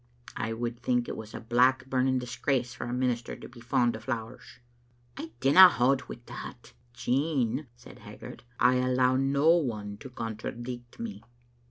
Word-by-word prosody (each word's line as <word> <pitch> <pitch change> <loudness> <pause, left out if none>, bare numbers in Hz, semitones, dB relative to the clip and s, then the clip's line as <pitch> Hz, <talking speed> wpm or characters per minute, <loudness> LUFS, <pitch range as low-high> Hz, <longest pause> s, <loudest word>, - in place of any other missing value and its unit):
" 120 - -17
I 115 0 -2
would 120 +1 -4
think 125 0 0
it - - -4
was 110 -1 -9
a - - -5
black 125 +3 +3
burning 130 0 +1
disgrace 125 0 -1
for 120 - -6
a 120 - -4
minister 125 -2 -1
to - - -10
be 120 - -15
fond 120 0 +1
o' - - -6
flowers." 115 +1 -6 0.3
" 120 0 -36
I 110 - -6
dinna 180 +8 +9
baud 130 +3 +2
wi' 120 - -8
that." 120 - -9 0.2
"Jean," 130 +1 0
said - - -15
Haggart, - - -11 0.2
"I 125 +1 +5
allow 125 0 +2
no 140 +4 +3
one 105 -10 -2
to 135 - -10
contradict 120 +1 -6
me. 230 -3 -6
125 Hz, 175 wpm, -28 LUFS, 120-130 Hz, 0.3 s, dinna